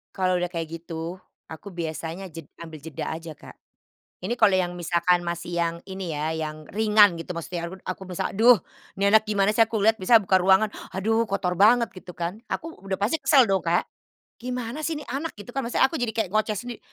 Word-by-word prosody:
Kalau 185 Hz, -2 st, +1 dB
udah 180 Hz, -, -1 dB
kayak 165 Hz, -2 st, -4 dB
gitu, 165 Hz, +1 st, -6 dB, 0.3 s
aku 160 Hz, +5 st, -10 dB
biasanya 170 Hz, +1 st, -5 dB
jed 165 Hz, -3 st, -10 dB
ngambil 160 Hz, -2 st, -9 dB
jeda 155 Hz, -1 st, -6 dB
aja 165 Hz, 0 st, -7 dB
Kak. -, -, -13 dB, 0.7 s
Ini 205 Hz, +6 st, -1 dB
kalau 195 Hz, -, +5 dB
yang 180 Hz, -1 st, +1 dB
misalkan 175 Hz, +1 st, +2 dB
masih 170 Hz, 0 st, -4 dB
yang 170 Hz, 0 st, 0 dB
ini 190 Hz, -4 st, -5 dB
ya, 155 Hz, +2 st, -1 dB
yang 155 Hz, -1 st, -4 dB
ringan 210 Hz, -4 st, +5 dB
gitu 175 Hz, +1 st, -6 dB
maksudnya 170 Hz, +1 st, -4 dB
aku 185 Hz, -, -8 dB
aku 185 Hz, +1 st, -5 dB
misalnya, 180 Hz, -2 st, -3 dB
"Aduh, 230 Hz, +4 st, +6 dB, 0.4 s
nih 200 Hz, +1 st, +2 dB
anak 220 Hz, 0 st, +6 dB
gimana 205 Hz, -1 st, +2 dB
sih," 220 Hz, -, -3 dB
aku 220 Hz, -2 st, +2 dB
lihat 220 Hz, +1 st, +4 dB
biasanya 220 Hz, +3 st, +5 dB
buka 190 Hz, 0 st, +4 dB
ruangan, 190 Hz, +3 st, +4 dB, 0.3 s
"Aduh, 225 Hz, +4 st, +1 dB
kotor 180 Hz, -2 st, -1 dB
banget," 235 Hz, +3 st, +5 dB
gitu 180 Hz, -1 st, -11 dB
kan, 175 Hz, +4 st, -4 dB
aku 330 Hz, -, -4 dB
udah 195 Hz, -1 st, -3 dB
pasti 210 Hz, +12 st, 0 dB
kesel 275 Hz, -5 st, +5 dB
dong 195 Hz, -3 st, +1 dB
Kak. 170 Hz, +1 st, +1 dB, 0.5 s
"Gimana 250 Hz, +4 st, -5 dB
sih 330 Hz, -, -1 dB
ini -, -, -12 dB
anak," 285 Hz, +6 st, -3 dB
gitu 225 Hz, -, -9 dB
kan, 270 Hz, -, 0 dB
maksudnya 240 Hz, +2 st, +3 dB
aku 325 Hz, -, -4 dB
jadi 245 Hz, -5 st, -1 dB
kayak 220 Hz, -3 st, -1 dB
ngoceh 215 Hz, 0 st, +1 dB
sendiri, 235 Hz, +3 st, -6 dB
190 Hz, 210 wpm, -25 LUFS, 170-220 Hz, 0.7 s, Aduh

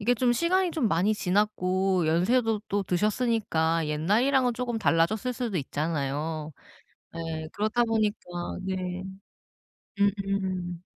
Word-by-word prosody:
이게 240 Hz, +4 st, +2 dB
좀 245 Hz, 0 st, +2 dB
시간이 350 Hz, +6 st, +2 dB
좀 280 Hz, -9 st, +1 dB
많이 190 Hz, +5 st, +2 dB
지났고 185 Hz, -3 st, +1 dB
연세도 215 Hz, +6 st, +2 dB
또 205 Hz, 0 st, 0 dB
드셨으니까 185 Hz, -5 st, +1 dB
옛날이랑은 235 Hz, -, +2 dB
쪼금 240 Hz, -2 st, -2 dB
달라졌을 200 Hz, +6 st, +1 dB
수도 235 Hz, -6 st, -3 dB
있잖아요. 150 Hz, +1 st, -2 dB, 0.6 s
예. 160 Hz, -1 st, -4 dB
그렇다 215 Hz, +3 st, +1 dB
보니까 220 Hz, -2 st, +1 dB, 0.4 s
네. 185 Hz, -1 st, -3 dB, 1.0 s
음음. 195 Hz, -3 st, -1 dB
195 Hz, 265 characters per minute, -27 LUFS, 165-225 Hz, 1.0 s, 이게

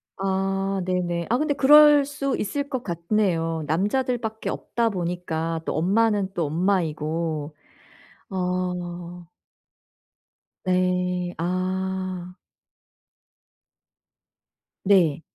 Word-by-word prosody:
아 195 Hz, 0 st, -1 dB
네네. 175 Hz, -2 st, -1 dB
아 240 Hz, -, +3 dB
근데 300 Hz, 0 st, +1 dB
그럴 295 Hz, +1 st, +7 dB
수 275 Hz, -1 st, -2 dB
있을 280 Hz, +7 st, -2 dB
것 260 Hz, -4 st, -3 dB
같네요. 170 Hz, -2 st, 0 dB
남자들 225 Hz, -, +1 dB
밖에 220 Hz, -1 st, -4 dB
없다 235 Hz, -1 st, -1 dB
보니까 170 Hz, -3 st, -3 dB
또 -, -, -2 dB
엄마는 200 Hz, +3 st, +1 dB
또 170 Hz, -3 st, -1 dB
엄마이고. 160 Hz, -2 st, -1 dB, 0.8 s
어. 180 Hz, -1 st, -3 dB, 1.4 s
네. 180 Hz, -1 st, 0 dB
아. 185 Hz, +1 st, -2 dB, 2.5 s
네. 175 Hz, -6 st, +3 dB
185 Hz, 150 characters per minute, -24 LUFS, 170-205 Hz, 2.5 s, 그럴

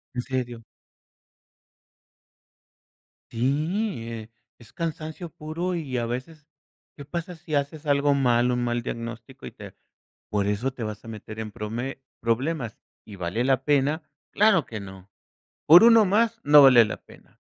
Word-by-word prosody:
¿En 125 Hz, -, -1 dB
serio? 120 Hz, -3 st, -4 dB, 2.7 s
Sí, 145 Hz, -, -1 dB
eh, 115 Hz, -1 st, -8 dB, 0.3 s
es 115 Hz, -, -18 dB
cansancio 165 Hz, 0 st, -5 dB
puro 165 Hz, +5 st, -4 dB
y 140 Hz, -7 st, -4 dB
a 120 Hz, -, -1 dB
veces, 145 Hz, +6 st, -6 dB, 0.5 s
¿qué 145 Hz, -, -9 dB
pasa 170 Hz, +3 st, -5 dB
si 160 Hz, -2 st, -5 dB
haces 145 Hz, +2 st, -2 dB
algo 145 Hz, 0 st, +3 dB
mal, 125 Hz, -3 st, +2 dB
un 125 Hz, 0 st, -1 dB
mal 120 Hz, 0 st, -1 dB
diagnóstico 115 Hz, +3 st, -7 dB
y -, -, -8 dB
te -, -, -12 dB, 0.5 s
por 100 Hz, -1 st, 0 dB
eso 110 Hz, +6 st, -1 dB
te 120 Hz, -, -6 dB
vas 110 Hz, 0 st, -6 dB
a -, -, -10 dB
meter 110 Hz, 0 st, -9 dB
en 110 Hz, -1 st, -5 dB
prome 120 Hz, +6 st, -5 dB, 0.2 s
problemas?, 120 Hz, +1 st, -2 dB, 0.3 s
y, 105 Hz, -, -10 dB
¿vale 90 Hz, +7 st, -2 dB
la 130 Hz, 0 st, +1 dB
pena?, 145 Hz, +2 st, +1 dB, 0.3 s
¡claro 200 Hz, -, +4 dB
que 110 Hz, -2 st, -7 dB
no!, 95 Hz, 0 st, -11 dB, 0.6 s
¿por 175 Hz, +7 st, +9 dB
uno 230 Hz, -1 st, +7 dB
más?, 230 Hz, +4 st, +1 dB
no 145 Hz, 0 st, +8 dB
vale 125 Hz, -4 st, +8 dB
la 105 Hz, -, -5 dB
pena. -, -, -20 dB
135 Hz, 150 wpm, -25 LUFS, 115-155 Hz, 2.7 s, por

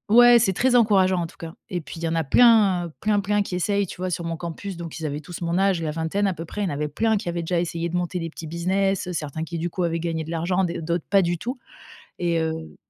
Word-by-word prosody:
ouais, 240 Hz, 0 st, +8 dB
c'est 190 Hz, -4 st, +2 dB
très 250 Hz, +5 st, +2 dB
encourageant 190 Hz, -6 st, +4 dB
en -, -, -1 dB
tout -, -, -18 dB
cas 165 Hz, 0 st, -8 dB, 0.2 s
et 175 Hz, -2 st, -2 dB
puis 145 Hz, -, -10 dB
il 170 Hz, -, -8 dB
y -, -, +1 dB
en 165 Hz, -, -1 dB
a 165 Hz, -, +1 dB
plein, 200 Hz, -, +5 dB
heu, 155 Hz, -, -13 dB
plein, 210 Hz, -1 st, +2 dB
plein 205 Hz, +1 st, +1 dB
qui 185 Hz, -, -5 dB
essayent, 200 Hz, +2 st, 0 dB
tu -, -, -9 dB
vois, 185 Hz, 0 st, -2 dB
sur 170 Hz, 0 st, -3 dB
mon 165 Hz, -1 st, -3 dB
campus, 175 Hz, +3 st, -6 dB
donc 170 Hz, -1 st, -7 dB
ils 160 Hz, -, -4 dB
avaient 150 Hz, 0 st, -3 dB
tous 175 Hz, +3 st, -9 dB
mon 170 Hz, 0 st, 0 dB
âge, 195 Hz, -3 st, +2 dB
la 155 Hz, -, -1 dB
vingtaine 165 Hz, +6 st, -1 dB
à 190 Hz, -, 0 dB
peu 165 Hz, -1 st, -7 dB
près, 210 Hz, +5 st, -4 dB
il 190 Hz, -, 0 dB
y -, -, -3 dB
avait 150 Hz, +1 st, -2 dB
plein 220 Hz, +9 st, +1 dB
qui 175 Hz, -, -4 dB
avaient 170 Hz, -1 st, -2 dB
déjà 170 Hz, +1 st, 0 dB
essayé 170 Hz, 0 st, -2 dB
de 175 Hz, -, -4 dB
monter 180 Hz, +1 st, -2 dB
des 165 Hz, -1 st, -4 dB
petits 160 Hz, -, -8 dB
business, 185 Hz, +3 st, 0 dB
certains 160 Hz, -1 st, -4 dB
qui, 165 Hz, 0 st, -5 dB
du 175 Hz, -, -2 dB
coup, 180 Hz, +1 st, -3 dB
avaient 165 Hz, 0 st, 0 dB
gagné 165 Hz, -1 st, -2 dB
de 160 Hz, -, -7 dB
l'argent, 175 Hz, +3 st, 0 dB
d 170 Hz, -1 st, -4 dB
d'autres 170 Hz, 0 st, -2 dB
pas 195 Hz, -1 st, +5 dB
du 175 Hz, 0 st, 0 dB
tout 250 Hz, +7 st, -5 dB, 0.6 s
et 170 Hz, -1 st, +1 dB
heu 160 Hz, 0 st, -4 dB
175 Hz, 295 wpm, -24 LUFS, 165-195 Hz, 0.6 s, ouais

